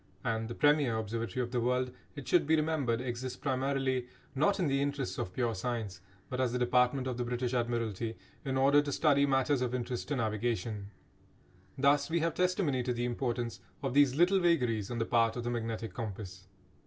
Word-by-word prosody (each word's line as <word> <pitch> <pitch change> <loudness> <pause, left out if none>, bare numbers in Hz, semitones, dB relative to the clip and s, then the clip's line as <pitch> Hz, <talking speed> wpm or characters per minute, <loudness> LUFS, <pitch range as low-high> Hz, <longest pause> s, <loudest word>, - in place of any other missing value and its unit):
And 115 -2 -1
the 120 - -6
premier 145 -6 +3
observatory 115 +3 -2
of 120 - -5
the 125 -2 0
world, 125 +1 +1 0.2
it 145 -3 -8
should 175 -5 +3
be 160 - +5
remembered, 150 -7 0
exists 125 0 -4
primarily, 130 -1 -1 0.3
not 155 +10 +2
in 180 - +2
the 140 -2 +1
interests 140 -2 -2
of 90 - -3
pure 115 +4 -1
science, 110 -3 -4 0.3
but 130 0 -2
as 125 -2 +1
a - - +2
department 125 +2 +2
of 130 -2 -3
the 125 - -1
British 125 +1 -2
Admiralty 115 -2 -1 0.3
in 135 -2 -1
order 140 +2 +5
to 145 -1 -4
study 140 -1 +3
matters 135 0 +2
of 125 0 -1
interest 125 0 -3
to 145 - -1
navigation. 110 -3 -2 0.9
Thus 140 +2 +3
we 170 +1 +1
have 165 -1 +1
testimony 180 -6 +1
to 125 0 -1
the 120 0 -2
importance 120 -3 -2 0.2
of 135 -2 -1
these 140 -2 +5
little 180 +5 +4
vagaries 125 - +1
on 120 - -3
the 115 - 0
part 115 -1 +2
of 120 - -4
the 120 - -2
magnetic 115 -1 -3
compass. 95 -5 -6
125 Hz, 195 wpm, -31 LUFS, 115-140 Hz, 0.9 s, be